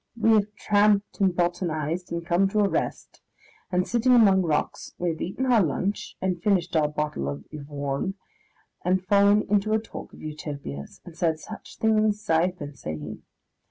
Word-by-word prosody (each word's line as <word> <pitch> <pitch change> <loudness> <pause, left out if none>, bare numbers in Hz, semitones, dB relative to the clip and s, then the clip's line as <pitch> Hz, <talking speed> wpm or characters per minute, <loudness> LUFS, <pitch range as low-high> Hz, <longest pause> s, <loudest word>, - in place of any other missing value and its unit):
We 225 +1 +4
have 210 -1 +3
tramped 205 0 +2
and 195 -2 +4
botanised 175 -1 -1
and 170 0 -3
come 180 +3 +2
to 210 +1 +1
a 200 - +4
rest, - - -3 0.5
and, 180 0 +1
sitting 240 +2 +3
among 200 -6 +6
rocks, 160 -4 -2
we 175 - -1
have 160 -1 -4
eaten 195 +9 -2
our 245 -4 +4
lunch 190 +5 -2
and 185 -2 -1
finished 180 -3 +1
our 155 -2 +4
bottle 150 - -2
of 70 0 -6
Yvorne, 145 +3 -3 0.7
and 185 +1 +1
fallen 200 +2 +5
into 210 +1 +1
a 220 - +3
talk 220 - -9
of - - -13
Utopias, 145 - -7
and 175 - -11
said 165 -2 +1
such 215 +7 -10
things 215 -1 +2
as 215 - -18
I 165 +2 +4
have 180 0 -6
been 145 -2 -7
saying. 80 - -7
180 Hz, 180 wpm, -26 LUFS, 155-205 Hz, 0.7 s, among